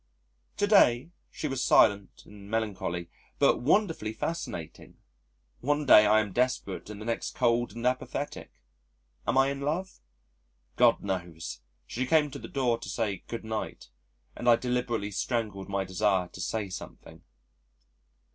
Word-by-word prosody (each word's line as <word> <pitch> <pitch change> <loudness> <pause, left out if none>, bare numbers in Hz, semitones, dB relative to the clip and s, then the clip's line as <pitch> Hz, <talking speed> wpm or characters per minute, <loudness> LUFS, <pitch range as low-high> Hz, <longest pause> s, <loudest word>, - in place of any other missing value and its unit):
To 205 - +2
day, 165 - +4 0.2
she 155 - -4
was 135 -2 -2
silent 100 -2 +3
and 100 -1 -13
melancholy 95 -6 -2 0.3
but - - +4
wonderfully 160 - +1
fascinating. 110 - -5 0.6
One 145 +3 0
day 105 -5 +8
I 110 +1 +5
am 105 -3 -5
desperate 125 -6 -1
and 105 -1 -8
the 110 - -8
next 115 0 -3
cold 120 -3 +1
and 120 +1 -5
apathetic. 125 0 -2 0.8
Am - - +1
I 135 +1 +4
in 140 - -5
love? 160 +7 -3 0.8
God - - +4
knows! 85 -10 -4 0.2
She 130 +2 -3
came 150 -1 +3
to 140 - -7
the - - -8
door 125 -4 0
to - - -8
say 105 -5 -2
"Good 115 -1 -6
night," 110 - -5 0.5
and 120 - 0
I 120 - +8
deliberately 120 -4 -2
strangled 105 -2 -2
my 100 0 0
desire 95 -1 +1
to 95 - -9
say 105 +4 -2
something. 90 - -10
115 Hz, 145 wpm, -28 LUFS, 100-130 Hz, 0.8 s, day